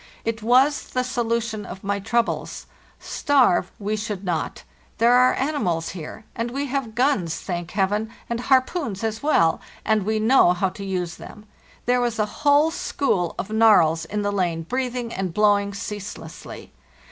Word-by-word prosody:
It 225 0 -2
was 255 +6 +3
the 255 - 0
solution 230 -3 -2
of 190 +1 -9
my 200 0 -1
troubles. 235 +4 -1 0.3
Starve 265 - +2
we 210 +1 -2
should 210 -2 -4
not; 175 -4 -3 0.3
there 235 +2 +4
are 250 +1 +5
animals 215 - -1
here, 185 +5 -8
and 230 +1 -2
we 275 +4 -3
have 260 -5 -3
guns, 240 - +1
thank 175 -2 -4
Heaven, 205 +3 0 0.2
and 235 0 -2
harpoons 255 - +1
as 220 0 -2
well, 170 - +3 0.2
and 220 -1 +2
we 220 +2 0
know 220 -5 +5
how 185 +2 0
to 200 +2 -9
use 180 -3 -3
them. 210 - -12 0.4
There 245 +1 +2
was 240 -2 -1
a 215 - +2 0.2
whole 295 +2 +4
school 185 - -1
of 210 - -5
narwhals 180 -8 +4
in 210 +4 -3
the 205 - 0
lane 175 -4 -1
breathing 250 +3 -3
and 185 -3 -3
blowing 205 -1 +3
ceaselessly. 200 0 -8
215 Hz, 160 wpm, -23 LUFS, 190-245 Hz, 0.4 s, are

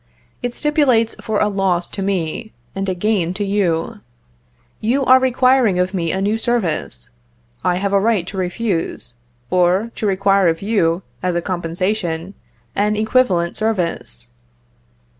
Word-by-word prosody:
It 245 -1 -3
stipulates 280 -7 +2
for 215 -2 -1
a 210 - +3
loss 190 -4 0
to 195 - -6
me, 190 +2 -2 0.2
and 195 0 -2
a 185 - -1
gain 185 -2 0
to 205 +1 -2
you. 195 +1 0 0.8
You 260 +5 +1
are 255 +1 +7
requiring 255 -5 +3
of 180 +1 0
me 170 -4 -1
a 190 - -1
new 210 +3 0
service; 175 - -2 0.5
I 175 - +2
have 200 +2 -1
a 200 - +5
right 210 -4 +1
to 195 - -7
refuse, 185 - -2 0.4
or 185 +5 +2
to 215 - -1
require 195 -1 +3
of 165 +2 0
you, 185 -5 +1 0.2
as 180 -1 -1
a - - +2
compensation, 180 0 -2 0.4
an 210 +1 +1
equivalent 210 -6 +1
service." 170 - -2
195 Hz, 145 wpm, -19 LUFS, 175-220 Hz, 0.8 s, are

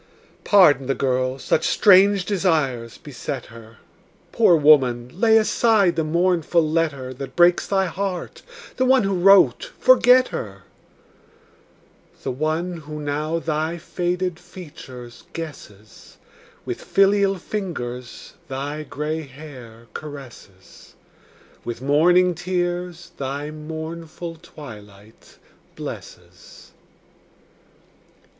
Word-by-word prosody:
Pardon 150 -10 +5
the 135 - 0
girl; 130 -1 -1
such 145 - 0
strange 195 -1 +5
desires 155 - -1
beset 140 -5 -6
her. 115 -1 -14 0.5
Poor 220 -7 +4
woman, 130 -6 +4
lay 220 +4 +4
aside 215 -4 +3
the 165 - 0
mournful 170 0 +1
letter 150 -5 -1
That 130 0 -8
breaks 175 0 +4
thy 195 -1 +1
heart; 185 0 -4 0.4
the 255 - +2
one 260 -2 +4
who 195 0 0
wrote, 195 - +4
forget 255 - +5
her: 100 -2 -7 1.6
The - - -2
one 155 +6 -2
who 150 -1 -8
now 150 +2 -2
thy 160 +1 -2
faded 180 +1 -3
features 145 -9 -12
guesses, 110 -10 -10 0.5
With - - -5
filial 195 0 +3
fingers 125 - -6
thy 140 +3 -5
gray 155 +1 -4
hair 130 -6 -12
caresses, 130 -10 -12 0.7
With 120 -1 -5
morning 175 +7 +3
tears 175 0 -3
thy 140 +2 -4
mournful 160 +2 -7
twilight 110 - -14 0.4
blesses. - - -11
155 Hz, 100 wpm, -22 LUFS, 135-180 Hz, 1.6 s, Pardon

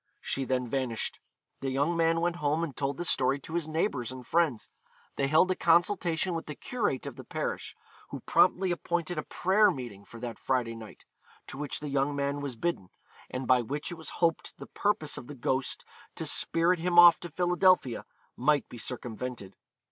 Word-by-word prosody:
She 135 - -2
then 125 -1 -1
vanished. 125 -3 -2 0.4
The 135 - -2
young 145 +6 +1
man 165 0 +2
went 175 0 0
home 150 +1 0
and 150 -5 -4
told 140 -1 -2
this 175 - +2
story 135 +1 +2
to 160 - -9
his 170 -2 -1
neighbours 155 - -1
and 130 -1 -9
friends. 160 -8 +1 0.5
They 135 - 0
held 155 +6 +4
a - - +1
consultation 175 0 +2
with 165 - -4
the 150 - -6
curate 220 - -2
of - - -7
the - - -8
parish, - - -4 0.3
who - - -7
promptly 185 0 +3
appointed 175 -1 -2
a - - 0
prayer 200 +7 +3
meeting 120 - -6
for 115 - -12
that 120 -2 -6
Friday 125 -3 0
night, 110 -2 -11 0.4
to - - -8
which 145 -1 -2
the 150 - -4
young 140 +1 0
man 140 0 -1
was 140 -4 -4
bidden, 115 - -2 0.4
and 130 +1 -4
by 125 -1 +5
which 145 +8 -4
it - - -5
was 160 -2 -7 0.2
hoped 165 -1 -2
the - - -9
purpose 200 -8 -1
of 120 - -12
the 145 - -8
ghost 130 +1 -2 0.3
to - - -4
spirit 170 +2 +2
him 175 +1 0
off 175 -1 +9
to 175 - -7
Philadelphia 180 -5 +2 0.3
might 145 +2 +2
be 120 - -9
circumvented. 120 -4 -5
145 Hz, 195 wpm, -29 LUFS, 130-170 Hz, 0.5 s, off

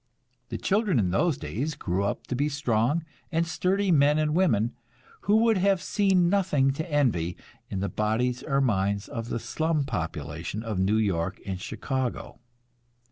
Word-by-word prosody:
The - - -3
children 205 - +1
in 95 -6 +2
those 140 - +2
days 120 - -3
grew 90 +3 -1
up 100 - -3
to 125 - -3
be 145 +4 +1
strong 145 +2 0 0.3
and 165 0 +1
sturdy 185 +4 +1
men 145 -1 +4
and 155 -1 +1
women, 120 - +2 0.6
who 210 - +6
would 225 -4 +3
have 195 0 +3
seen 190 -2 +2
nothing 170 -8 +2
to 160 +4 -5
envy 105 - +1 0.3
in 95 - -3
the 100 - 0
bodies 115 +5 0
or 140 -1 0
minds 100 -4 0
of 115 0 -5
the - - -1
slum 155 +6 -1
population 80 - -4
of 110 -5 -3
New 100 +3 +2
York 95 -4 0
and 95 -1 -4
Chicago. 130 +4 -3
130 Hz, 165 wpm, -27 LUFS, 100-160 Hz, 0.6 s, who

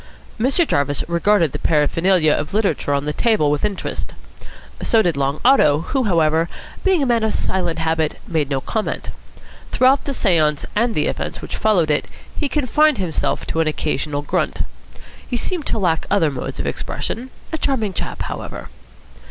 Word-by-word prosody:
Mr. 275 +8 +3
Jarvis 145 -1 0
regarded 170 -1 +2
the - - -5
paraphernalia 165 +1 +3
of 150 +6 -3
literature 195 -9 0
on 140 0 0
the 150 - -1
table 210 -8 +2
with 150 - -1
interest. 205 -2 -3 0.7
So 225 -1 +3
did 175 -3 +1
Long 140 +1 -1
Otto, 155 - +5
who, 260 +8 -1
however, 165 -3 +2 0.3
being 375 -6 +3
a - - +2
man 240 -2 +2
of 220 - +1
silent 175 -3 -1
habit, 160 -1 0
made 155 -5 0
no 135 -2 -1
comment. 220 +8 -3 0.6
Throughout 265 +2 +3
the 280 - -2
seance 155 -8 +2
and 230 +2 +1
the 150 - +1
events - - -3
which - - -5
followed 180 -8 +2
it 150 - 0 0.3
he 290 - -2
confined 300 +1 +3
himself 180 -5 -1
to 160 - -2
an 165 - +2
occasional 150 -1 -2
grunt. - - -1 0.7
He 245 - 0
seemed 340 +5 -2
to - - 0
lack 170 -6 0
other 180 -7 +3
modes 130 -2 -5
of - - -2
expression. 245 +4 -4 0.2
A 320 - -1
charming 230 -10 0
chap, - - -4
however. - - -6
175 Hz, 170 wpm, -20 LUFS, 150-230 Hz, 0.7 s, Otto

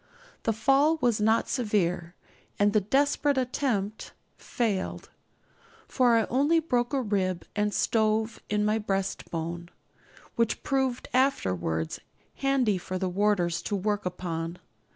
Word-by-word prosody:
The - - +5
fall 275 +8 +3
was 240 -5 +1
not 220 +2 +3
severe, 180 -7 -1 0.4
and 205 0 +3
the 215 - +4
'desperate 285 +5 +2
attempt' 240 -5 -1 0.2
failed; 215 -6 -3 0.8
for 245 -3 +3
I 225 -2 +3
only 290 +6 +2
broke 245 -7 0
a 275 -2 0
rib 190 -4 -1
and 210 0 +1
stove 220 +1 +1
in 210 0 +1
my 215 +1 +2
breastbone, 175 -4 -3 0.7
which 230 -1 0
proved 265 -2 0
afterwards 90 - 0 0.4
handy 260 -8 +1
for 185 +1 -4
the 185 0 -1
warders 180 -3 +1
to 205 - -2
work 205 +1 -1
upon. 170 -1 -4
210 Hz, 125 wpm, -27 LUFS, 185-250 Hz, 0.8 s, The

